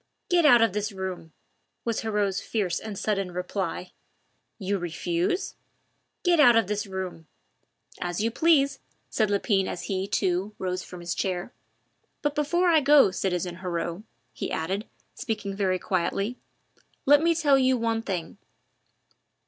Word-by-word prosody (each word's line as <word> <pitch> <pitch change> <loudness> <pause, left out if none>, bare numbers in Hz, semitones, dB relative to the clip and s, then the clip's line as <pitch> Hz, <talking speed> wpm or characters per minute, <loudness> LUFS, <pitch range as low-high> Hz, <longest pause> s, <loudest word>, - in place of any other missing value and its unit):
"Get 345 -3 +5
out 240 -5 +7
of 225 - +2
this 210 +1 -2
room," 190 -4 -6 0.5
was 230 -2 0
Heriot's 210 -3 0
fierce 190 -6 -1
and 215 -3 -7
sudden 195 -3 -1
reply. 180 0 -3 0.7
"You 200 -1 -1
refuse?" 345 - -1 0.7
"Get 350 -2 +3
out 245 -5 +7
of 225 - +4
this 210 +1 -2
room!" 185 -4 -6 0.7
"As 175 0 -2
you 225 +2 +1
please," 285 0 +3 0.3
said 215 -2 +1
Lepine 200 -1 +1
as 175 - -5
he, 190 0 -2
too, 190 +2 0
rose 185 -1 -2
from 180 -1 -10
his 170 0 -2
chair. 185 +3 -3 0.7
"But 295 -1 +1
before 345 +5 +1
I 320 -2 +5
go, 285 -6 +6
citizen 180 -2 -2
Heriot," 175 -1 -3 0.3
he - - -4
added, 190 +7 -2 0.3
speaking 215 -5 -4
very 190 -2 +1
quietly, 195 +6 -1 0.7
"let 290 +1 +6
me 335 0 +3
tell 290 -4 +4
you 260 -1 +3
one 225 -1 0
thing. 190 -3 -4
200 Hz, 145 wpm, -26 LUFS, 185-250 Hz, 0.7 s, out